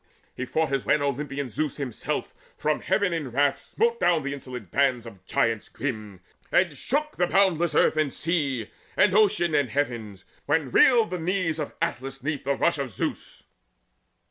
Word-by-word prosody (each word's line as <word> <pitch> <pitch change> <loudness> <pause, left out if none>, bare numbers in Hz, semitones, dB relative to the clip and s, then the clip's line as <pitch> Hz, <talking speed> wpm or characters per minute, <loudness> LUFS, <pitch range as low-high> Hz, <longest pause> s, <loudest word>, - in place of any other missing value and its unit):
He 130 - -3
fought 160 +3 0
as 135 -2 0
when 145 0 +2
Olympian 140 0 -2
Zeus 150 +5 -2
himself 135 -6 -3 0.2
From 155 0 0
heaven 200 -4 +1
in 155 -5 -3
wrath 140 +3 +2
smote 470 +1 0
down 165 - +3
the 140 0 -3
insolent 125 -9 -8
bands 130 -4 +2
Of 100 -5 -12
giants 115 -1 0
grim, 110 -8 -5 0.3
and 175 -5 +3
shook 300 - -2
the 175 - +2
boundless 175 -5 +2
earth, - - +4
And 155 -3 +1
sea, 140 -10 -1 0.3
and 185 - +4
ocean, 205 -5 +3
and 145 -3 +3
the - - -11
heavens, 115 -9 -3 0.2
when 145 -3 +1
reeled 230 - +5
The 180 - -2
knees 170 -2 -1
of 150 - -4
Atlas 135 +1 -4
neath 145 -2 -3
the 140 0 +1
rush 170 +2 +1
of 135 -2 -2
Zeus. 100 - -5
145 Hz, 175 wpm, -26 LUFS, 130-170 Hz, 0.3 s, reeled